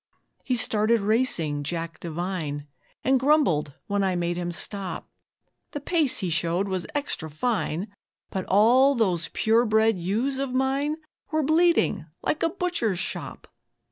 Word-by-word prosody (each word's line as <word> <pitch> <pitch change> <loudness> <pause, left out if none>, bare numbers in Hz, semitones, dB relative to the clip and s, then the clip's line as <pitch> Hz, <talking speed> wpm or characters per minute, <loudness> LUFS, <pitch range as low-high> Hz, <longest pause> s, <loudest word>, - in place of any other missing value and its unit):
He 255 - 0
started 220 -1 +2
racing 200 - +2
Jack 165 +3 -4
Devine, 165 -3 -4 0.4
And 265 0 +3
grumbled 255 - +2
when 200 -1 0
I 190 -1 +1
made 175 0 -1
him 175 0 -3
stop. 195 +2 -4 0.7
The 290 - -3
pace 305 -2 +2
he 175 - -1
showed 170 +4 +1
was 185 -2 -3
extra 285 - -3
fine, 185 +1 -1 0.4
But 190 -1 -3
all 250 +8 +5
those 185 -8 +1
pure 225 +2 +3
bred 220 -2 +2
ewes 230 +10 -1
of 270 -2 -2
mine 270 +3 +1 0.3
Were 310 -1 0
bleeding 320 - +2 0.2
like 305 - -1
a 330 - +2
butcher's 340 - -1
shop. 190 - -5
215 Hz, 140 wpm, -25 LUFS, 175-265 Hz, 0.7 s, all